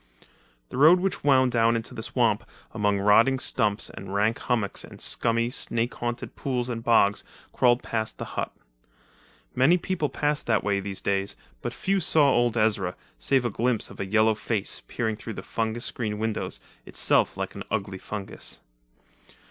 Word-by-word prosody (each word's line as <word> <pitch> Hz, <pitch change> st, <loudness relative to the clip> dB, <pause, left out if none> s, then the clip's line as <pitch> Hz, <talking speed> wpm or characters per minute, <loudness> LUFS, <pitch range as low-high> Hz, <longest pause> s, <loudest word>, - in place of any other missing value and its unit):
The -, -, -6 dB
road, 160 Hz, +6 st, +7 dB
which 195 Hz, +1 st, -2 dB
wound 130 Hz, -3 st, +4 dB
down 115 Hz, 0 st, +3 dB
into 115 Hz, +2 st, -3 dB
the 115 Hz, -, -6 dB
swamp 115 Hz, -1 st, +1 dB, 0.3 s
among 105 Hz, -2 st, +1 dB
rotting 115 Hz, +7 st, +4 dB
stumps 110 Hz, -5 st, 0 dB
and 95 Hz, -, -9 dB
rank 105 Hz, +3 st, +1 dB
hummocks 110 Hz, -5 st, -1 dB
and -, -, -12 dB
scummy, 115 Hz, 0 st, 0 dB
snake 115 Hz, -1 st, 0 dB
haunted 120 Hz, 0 st, -4 dB
pools 125 Hz, -2 st, -2 dB
and 115 Hz, -2 st, -4 dB
bogs, 105 Hz, -4 st, +3 dB, 0.3 s
crawled 120 Hz, 0 st, +3 dB
past 110 Hz, -1 st, -2 dB
the -, -, -5 dB
hut. -, -, -2 dB, 1.0 s
Many 140 Hz, +8 st, +4 dB
people 170 Hz, -4 st, -2 dB
passed 150 Hz, 0 st, -1 dB
that 115 Hz, -3 st, +2 dB
way 100 Hz, -1 st, +1 dB
these 100 Hz, 0 st, -5 dB
days, 100 Hz, 0 st, 0 dB, 0.3 s
but -, -, -3 dB
few 195 Hz, 0 st, 0 dB
saw 155 Hz, -4 st, +4 dB
old 120 Hz, -1 st, +2 dB
Ezra, 105 Hz, -5 st, +1 dB, 0.2 s
save 125 Hz, -, +2 dB
a 120 Hz, -, 0 dB
glimpse 120 Hz, +2 st, 0 dB
of -, -, -13 dB
a -, -, -2 dB
yellow 110 Hz, +2 st, +4 dB
face, 105 Hz, -1 st, -2 dB
peering 110 Hz, -2 st, -2 dB
through 115 Hz, +1 st, -7 dB
the -, -, -7 dB
fungus 115 Hz, +1 st, -2 dB
screened 105 Hz, -3 st, -2 dB
windows, 110 Hz, -1 st, -2 dB, 0.2 s
itself -, -, +1 dB
like -, -, -3 dB
an -, -, -8 dB
ugly 95 Hz, -3 st, -3 dB
fungus. 100 Hz, -1 st, -6 dB
115 Hz, 170 wpm, -26 LUFS, 105-125 Hz, 1.0 s, road